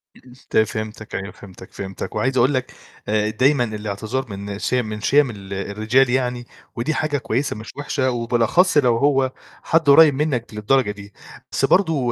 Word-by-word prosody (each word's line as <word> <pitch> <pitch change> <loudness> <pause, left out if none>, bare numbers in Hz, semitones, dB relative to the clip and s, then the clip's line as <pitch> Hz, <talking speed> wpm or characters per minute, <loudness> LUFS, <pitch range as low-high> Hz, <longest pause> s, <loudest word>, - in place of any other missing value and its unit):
إمم، - - -18
إمم، 125 - -15 0.2
ت - - 0
فهمتك 110 0 -2
أيوه، 100 +1 -4
فهمتك، 95 -2 -14
فهمتك، 95 -1 -6
وعايز 130 0 0
أقول 130 +4 +3
لك 130 -1 -2 0.4
آآ، 105 0 +1
دايمًا 130 +4 +2
الإعتذار 110 +3 -4
من 100 0 -6
شيَم 125 +1 0
من 105 0 -6
شيَم 140 +3 +3
ال 100 -3 -8
الرجال 110 +6 +1
يعني 125 -1 -1 0.3
ودي 125 +7 -1
حاجة 155 -2 -1
كويسة 125 +3 -2
مش 110 +1 -9
وِحشة 140 -2 -1
وبالأخص 120 - +2
لو 125 -5 +4
هو 135 0 +2 0.3
حد 165 -2 +2
قريّب 150 +1 +8
منّك 135 -6 -2
للدرجة 105 +2 +1
دي، 100 0 -12 0.4
بس - - +1
برضه 160 -10 +2
120 Hz, 175 wpm, -21 LUFS, 105-135 Hz, 0.4 s, قريّب